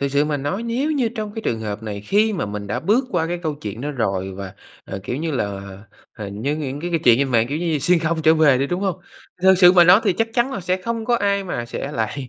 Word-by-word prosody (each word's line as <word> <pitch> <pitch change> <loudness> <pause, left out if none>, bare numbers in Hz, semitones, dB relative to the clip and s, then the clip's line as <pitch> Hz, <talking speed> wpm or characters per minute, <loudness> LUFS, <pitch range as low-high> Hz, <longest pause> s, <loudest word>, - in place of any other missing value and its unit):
Thiệt 140 0 -1
sự 145 +1 +3
mà 150 -1 -1
nói 145 +11 -3
nếu 245 +6 -1
như 260 -6 +1
trong 215 -2 -6
cái 225 - -5
trường 115 - -1
hợp 105 0 -5
này 105 -2 -5
khi 210 - +2
mà 180 - -2
mình 105 0 -6
đã 105 - -3
bước 230 +7 +2
qua 170 -3 0
cái 175 +1 -3
câu 155 -2 -2
chuyện 110 -5 -7
đó 145 - -3
rồi 95 -8 -2
và, 95 -1 -8 0.3
ờ, 95 - -6
kiểu 125 - -3
như 160 +3 -2
là, 130 - 0
ờ, 100 -1 -7 0.5
h - - -9
như 135 +9 -2
những 145 -1 -4
cái 175 - -4
cái 165 -2 0
chuyện 120 0 +6
trên 140 - +1
mạng, 115 -1 +3
kiểu, 145 - -2
như 175 - -3
như 160 -3 +1
xuyên 175 +5 +3
không 160 0 -1
trở 160 +1 +5
về 150 -5 +4
đi, 135 - 0
đúng 175 +5 -2
hông? 195 -3 -1 0.5
Thì - - +2
thật 190 - +8
sự 180 -1 +8
mà 175 -2 +7
nói 180 +4 +7
thì 195 - +3
chắc 225 +5 -1
chắn 250 +2 +1
là 200 - -4
sẽ 185 +1 0
không 230 +1 -3
có 240 +1 +2
ai 200 -2 0
mà 120 -10 -4
sẽ 140 +4 -5
lại 125 +3 -3
155 Hz, 305 wpm, -21 LUFS, 115-195 Hz, 0.5 s, thật